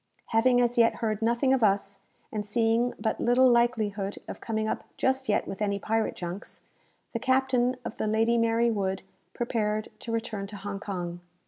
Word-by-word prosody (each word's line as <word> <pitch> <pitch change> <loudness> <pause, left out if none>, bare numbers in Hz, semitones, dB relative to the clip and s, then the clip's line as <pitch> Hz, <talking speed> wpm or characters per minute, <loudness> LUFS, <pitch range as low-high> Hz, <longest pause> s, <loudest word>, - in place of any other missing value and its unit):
Having 245 +2 +4
as 240 0 +1
yet 230 0 +5
heard 220 -2 -2
nothing 235 +4 +2
of 260 -3 +2
us, 200 -1 +1 0.3
and 215 -1 -2
seeing 230 +3 +1
but 220 - -1
little 250 +2 +5
likelihood 215 -4 +1
of - - -7
coming 220 -2 -1
up - - -2
just 265 -2 0
yet 205 - +1
with 195 - -6
any 200 -1 +1
pirate 220 +2 -1
junks, 180 +4 -6 0.5
the 230 - -1
captain 260 -1 +2
of - - -5
the - - -1
"Lady 225 +2 +2
Mary 230 +1 +3
Wood" 195 -3 -1 0.3
prepared 215 -3 -1
to 230 - -6
return 225 -3 -3
to 205 0 -8
Hong 195 0 -5
Kong. 175 -4 -4
225 Hz, 180 wpm, -28 LUFS, 205-240 Hz, 0.5 s, yet